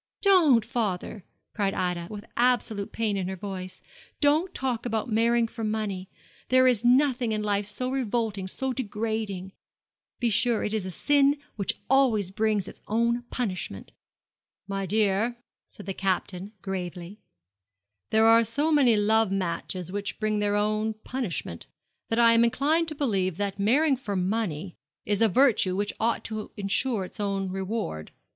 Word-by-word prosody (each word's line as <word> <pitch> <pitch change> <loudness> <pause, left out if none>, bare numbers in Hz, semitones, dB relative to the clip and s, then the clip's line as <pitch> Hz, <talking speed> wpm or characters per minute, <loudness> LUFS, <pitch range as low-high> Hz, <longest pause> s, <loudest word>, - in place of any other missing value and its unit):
'Don't, 320 - +5
father!' 205 -3 -3 0.3
cried 200 -3 -1
Ida, 175 -2 -2
with 210 0 -8
absolute 240 -4 +1
pain 220 -3 -1
in 185 -2 -2
her 190 - -4
voice. 185 -1 -7 0.4
'Don't 310 +5 +2
talk 250 -3 -2
about 225 -1 -2
marrying 230 +1 +3
for 225 0 -7
money. 210 -4 -3 0.4
There 255 0 +5
is 245 -3 +3
nothing 250 -2 +3
in 210 0 -2
life 205 -1 0
so 250 +5 -3
revolting, 225 -6 -1
so 265 +7 -3
degrading. 215 -5 -3 0.7
Be 235 -2 +1
sure, 230 +1 +2
it 210 - -2
is 210 -4 -2
a - - -4
sin 285 - +3 0.2
which 200 -3 -1
always 235 -8 +3
brings 210 -1 0
its - - -11
own 235 +2 +1
punishment.' 185 - -4 0.8
'My 195 -1 -3
dear,' 215 +3 +1 0.3
said 205 - -12
the 195 - -3
Captain, 190 0 -2
gravely, 185 0 -5 0.9
'there 220 0 +4
are 230 +1 +7
so 290 +8 0
many 260 -7 +5
love 220 0 +3
matches 180 -1 -3
which 205 +1 -3
bring 215 -1 0
their 205 0 +1
own 215 +1 0
punishment, 185 - -4 0.4
that 225 - 0
I 230 -1 +6
am 230 0 +5
inclined 300 +8 +2
to 310 - -3
believe 195 - 0
that 200 -1 -2
marrying 270 +8 +3
for 210 -6 -4
money 185 -3 -2 0.3
is 205 0 0
a 225 - +5
virtue 215 -5 +3
which 205 +1 -1
ought 230 +1 +1
to 215 -1 -5
ensure 205 +1 0
its - - -12
own 195 -2 -1
reward. 190 - -4
215 Hz, 155 wpm, -26 LUFS, 195-240 Hz, 0.9 s, are